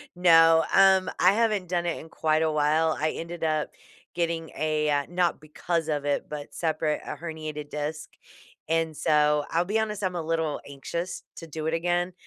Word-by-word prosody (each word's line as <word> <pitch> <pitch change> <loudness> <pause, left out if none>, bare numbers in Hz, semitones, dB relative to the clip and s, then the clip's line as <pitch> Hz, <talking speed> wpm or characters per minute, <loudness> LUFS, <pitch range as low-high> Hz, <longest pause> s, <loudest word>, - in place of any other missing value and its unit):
No, 165 -2 +6
um, 190 -1 +5
I 185 +2 +5
haven't 215 -4 +1
done 175 -1 0
it 170 - -2
in 160 - -12
quite 155 0 +1
a 160 -1 +2
while, 155 +1 +2
I 155 +1 +1
ended 170 0 -6
up 155 -1 0 0.5
getting 165 -2 -1
a, 155 0 0
uh, 145 -1 +1
not 175 -1 0
because 160 +2 -3
of 150 -2 -1
it, 145 -1 0
but 150 -1 -7
separate 155 -2 -1
a - - -5
herniated 155 -3 -6
disc. 150 +1 -4 0.6
And 165 0 0
so, 150 -1 +2
I'll 170 +2 +1
be 210 +4 0
honest, 210 -2 -2
I'm 185 -1 -1
a 175 - -2
little 160 -2 -1
anxious 170 +6 -5
to 165 - -8
do 155 0 -6
it 160 - 0
again. 175 +2 0
160 Hz, 185 wpm, -26 LUFS, 155-175 Hz, 0.6 s, No